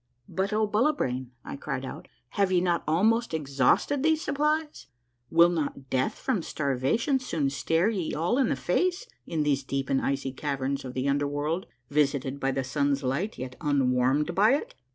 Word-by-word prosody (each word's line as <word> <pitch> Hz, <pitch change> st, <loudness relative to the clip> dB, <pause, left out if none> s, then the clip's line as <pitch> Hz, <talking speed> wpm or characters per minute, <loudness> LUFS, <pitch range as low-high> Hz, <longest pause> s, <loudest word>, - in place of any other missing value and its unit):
"But, 195 Hz, +2 st, -2 dB
O 215 Hz, +1 st, +2 dB
Bullibrain," 205 Hz, -, 0 dB, 0.2 s
I -, -, -5 dB
cried 135 Hz, -2 st, -4 dB
out, -, -, -8 dB, 0.2 s
"have 200 Hz, -2 st, +1 dB
ye 180 Hz, -, +4 dB
not 175 Hz, -1 st, +1 dB
almost 215 Hz, +5 st, +2 dB
ex 140 Hz, -3 st, -6 dB
hausted 265 Hz, -, +3 dB
these 315 Hz, +1 st, +2 dB
supplies? 300 Hz, -, -1 dB, 0.4 s
Will 170 Hz, +1 st, +6 dB
not 145 Hz, -5 st, -3 dB
death 130 Hz, 0 st, +1 dB
from 255 Hz, -9 st, -1 dB
starvation 145 Hz, -, 0 dB
soon 155 Hz, -, -1 dB
stare 165 Hz, +6 st, +1 dB
ye 185 Hz, -7 st, -2 dB
all 175 Hz, -, +1 dB
in 260 Hz, -, +3 dB
the -, -, +1 dB
face 365 Hz, -, 0 dB, 0.2 s
in 160 Hz, -2 st, 0 dB
these 140 Hz, -2 st, +1 dB
deep 135 Hz, 0 st, -3 dB
and 135 Hz, -, +2 dB
icy 135 Hz, -1 st, -1 dB
caverns 140 Hz, 0 st, -2 dB
of 130 Hz, -1 st, -7 dB
the 130 Hz, +1 st, -1 dB
under 140 Hz, +1 st, +1 dB
world, 150 Hz, +5 st, -2 dB, 0.2 s
visited 140 Hz, -2 st, +1 dB
by 135 Hz, -, 0 dB
the 135 Hz, 0 st, -1 dB
sun's 140 Hz, +1 st, 0 dB
light 140 Hz, +12 st, -1 dB
yet 130 Hz, 0 st, -6 dB
un 140 Hz, -5 st, +2 dB
warmed 130 Hz, +6 st, +2 dB
by 215 Hz, +8 st, +5 dB
it 290 Hz, -, -5 dB
150 Hz, 185 wpm, -27 LUFS, 135-205 Hz, 0.4 s, Will